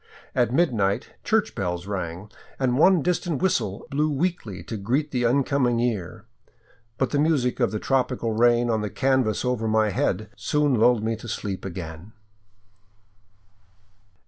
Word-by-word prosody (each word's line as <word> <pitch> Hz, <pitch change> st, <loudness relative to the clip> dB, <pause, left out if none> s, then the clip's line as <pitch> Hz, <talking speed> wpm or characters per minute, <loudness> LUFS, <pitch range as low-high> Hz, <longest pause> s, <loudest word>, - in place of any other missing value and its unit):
At 120 Hz, -2 st, +2 dB
midnight 120 Hz, -, +1 dB
church -, -, +1 dB
bells 90 Hz, -1 st, -3 dB
rang, 95 Hz, 0 st, -5 dB, 0.3 s
and 130 Hz, -2 st, +1 dB
one 180 Hz, -2 st, +5 dB
distant 175 Hz, -4 st, -1 dB
whistle 110 Hz, -, 0 dB
blew 150 Hz, +2 st, +1 dB
weakly 145 Hz, -, -2 dB
to 115 Hz, -, -6 dB
greet 130 Hz, +9 st, -1 dB
the 125 Hz, -2 st, 0 dB
incoming 125 Hz, -1 st, +2 dB
year, 115 Hz, -2 st, -2 dB, 0.7 s
but 135 Hz, -, 0 dB
the 145 Hz, -, +1 dB
music 145 Hz, -6 st, +1 dB
of 120 Hz, -, +3 dB
the 110 Hz, -, -3 dB
tropical 125 Hz, -1 st, 0 dB
rain 120 Hz, +1 st, +3 dB
on 110 Hz, -1 st, 0 dB
the 105 Hz, -, -3 dB
canvas 130 Hz, -3 st, +1 dB
over 125 Hz, -3 st, 0 dB
my 110 Hz, -1 st, +2 dB
head 100 Hz, +2 st, -1 dB
soon 150 Hz, +1 st, +1 dB
lulled 115 Hz, -1 st, +3 dB
me 115 Hz, +1 st, 0 dB
to 120 Hz, -, -10 dB
sleep 100 Hz, -3 st, -4 dB
again. 85 Hz, +1 st, -7 dB
120 Hz, 145 wpm, -24 LUFS, 105-135 Hz, 0.7 s, one